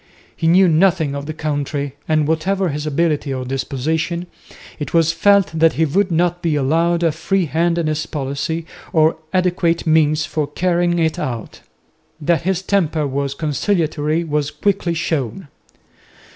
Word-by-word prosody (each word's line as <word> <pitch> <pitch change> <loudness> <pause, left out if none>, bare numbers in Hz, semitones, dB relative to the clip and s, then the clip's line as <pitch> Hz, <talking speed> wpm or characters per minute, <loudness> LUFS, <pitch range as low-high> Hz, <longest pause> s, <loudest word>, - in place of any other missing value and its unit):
He 165 - -1
knew 185 +3 +6
nothing 160 -3 +2
of 140 0 -5
the 155 - -4
country, 145 -2 -3
and 155 -2 +2
whatever 185 +4 0
his 150 +1 -4
ability 150 -1 0
or 130 -1 -3
disposition 155 +6 -2 0.5
it 150 +2 -4
was 165 -1 +4
felt 200 +3 +3
that 160 0 +3
he 160 - +2
would 185 +6 +1
not 175 +1 +1
be 165 -3 0
allowed 165 +5 +1
a 165 - +3
free 185 +4 0
hand 165 +3 0
in 170 - 0
his 155 0 -1
policy 145 +3 -3 0.3
or 160 0 +3
adequate 175 -2 +1
means 155 -1 +3
for 155 -3 -2
carrying 175 +3 0
it 160 -2 0
out. 120 -4 -5 0.6
That 160 -1 +1
his 190 +1 -1
temper 165 -6 +1
was 140 0 -2
conciliatory 155 0 0
was 150 -2 -1
quickly 180 -4 -1
shown. 155 - -3
160 Hz, 155 wpm, -19 LUFS, 150-170 Hz, 0.6 s, knew